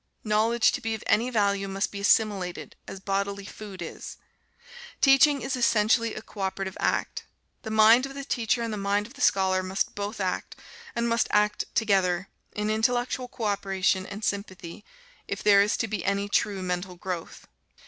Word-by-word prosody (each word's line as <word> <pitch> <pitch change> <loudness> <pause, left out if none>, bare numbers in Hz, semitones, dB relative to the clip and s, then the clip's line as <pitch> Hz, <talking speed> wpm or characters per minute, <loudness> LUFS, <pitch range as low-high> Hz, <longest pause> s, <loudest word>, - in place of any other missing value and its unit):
Knowledge, 220 +2 +3
to 275 - -4
be 225 -1 -2
of 220 - -9
any 235 +4 +2
value, 200 -4 +1
must 195 +1 -2
be 200 - -6
assimilated, 200 -3 +1
as 190 - -7
bodily 200 0 -2
food 195 -4 -8
is. 160 - -8 0.8
Teaching 280 +1 +5
is 270 - -2
essentially 230 -1 +2
a 215 - -7
co 215 - -14
operative 190 0 -3
act. - - -1 0.4
The 220 - -7
mind 220 +4 +5
of 275 - -11
the 280 - -5
teacher 235 -2 0
and 230 -1 -3
the - - -3
mind 200 +1 0
of 235 - -13
the 285 - -11
scholar 190 -6 +3
must 185 +1 -2
both 205 +2 -5
act, 185 -2 -3 0.4
and 235 0 0
must 230 -1 +1
act 210 0 +2
together, 195 -4 +1 0.2
in 210 +1 -2
intellectual 245 +3 0
co 245 -2 -8
operation 195 -2 0
and 205 +1 -6
sympathy, 195 -2 -5 0.4
if - - -4
there 200 -1 +6
is 205 +1 +1
to 225 - -1
be 215 0 -3
any 200 +1 0
true 200 -1 0
mental 180 0 -3
growth. 175 -1 -6
205 Hz, 180 wpm, -26 LUFS, 195-225 Hz, 0.8 s, there